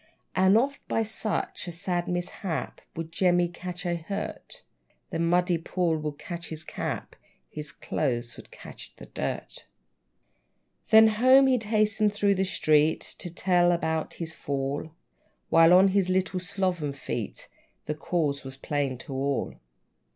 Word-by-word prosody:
And 190 +3 +5
oft, 275 +4 +1
by 225 - +1
such 215 -3 -3
a - - -3
sad 175 0 -2
mishap, 175 -1 -3
Would 165 0 -5
Jemmy 175 0 +3
catch 180 +1 -7
a 175 -1 0
hurt; 200 - -6 0.5
The 165 - -2
muddy 175 +1 +2
pool 170 0 0
would 150 -1 -4
catch 170 +1 -7
his 155 -1 -6
cap, - - -5 0.4
His 150 -1 -6
clothes 120 -5 -2
would - - -13
catch - - -11
the - - -11
dirt! - - -5 1.2
Then 220 0 +8
home 255 +5 +6
he'd 250 -4 +2
hasten 215 0 +2
through 205 -1 +2
the 190 0 0
street, 155 -4 +2
To 175 - -5
tell 175 0 +3
about 160 -2 -1
his 160 -2 -5
fall; 140 +1 -3 0.6
While, 165 +1 +6
on 185 +2 +7
his 190 -1 +2
little 185 0 +1
sloven 180 -5 -1
feet, 140 - -5 0.4
The 150 - -1
cause 150 -2 -1
was 135 0 -6
plain 140 -2 -2
to 135 - -8
all. 135 +1 -1
175 Hz, 145 wpm, -27 LUFS, 155-195 Hz, 1.2 s, Then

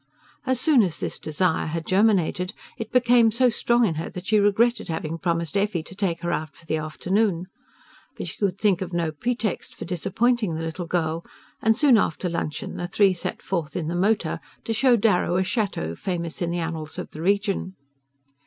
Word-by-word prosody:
As 260 -1 +2
soon 270 -1 +5
as 180 -6 -1
this - - -3
desire 160 +2 0
had 165 +1 -3
germinated 185 -3 +2 0.2
it 225 -1 -6
became 245 -2 +5
so 250 +3 +4
strong 235 +1 +2
in 180 - +1
her - - -5
that 180 0 -8
she 215 +1 +3
regretted 215 +4 +2
having 165 -1 -3
promised 170 -1 -1
Effie 200 -4 +1
to 185 - -11
take 185 -4 -1
her 175 -1 -1
out 155 -1 -3
for 170 - -18
the 155 - 0
afternoon. 180 +4 0 0.7
But - - -4
she - - -7
could 195 -2 0
think 195 -4 +2
of 185 -1 -4
no 170 -2 0
pretext 230 +5 -2
for - - -7
disappointing 200 +3 0
the 160 - -3
little 165 +2 -4
girl, 165 -1 -1 0.4
and 225 0 +3
soon 265 -7 +6
after 180 -1 -1
luncheon 165 -3 -3
the 175 - -3
three 195 +1 +4
set 175 - -5
forth 170 -5 -3
in 160 -2 -2
the 170 - -2
motor 205 +4 +1 0.2
to 225 - -2
show 250 +2 +4
Darrow 200 -5 +2
a 185 - +3
chateau 190 - -1
famous 170 - -4
in 175 - 0
the 175 - -2
annals 160 -2 -4
of - - -6
the 155 - -8
region. 195 0 0
185 Hz, 200 wpm, -24 LUFS, 165-215 Hz, 0.7 s, soon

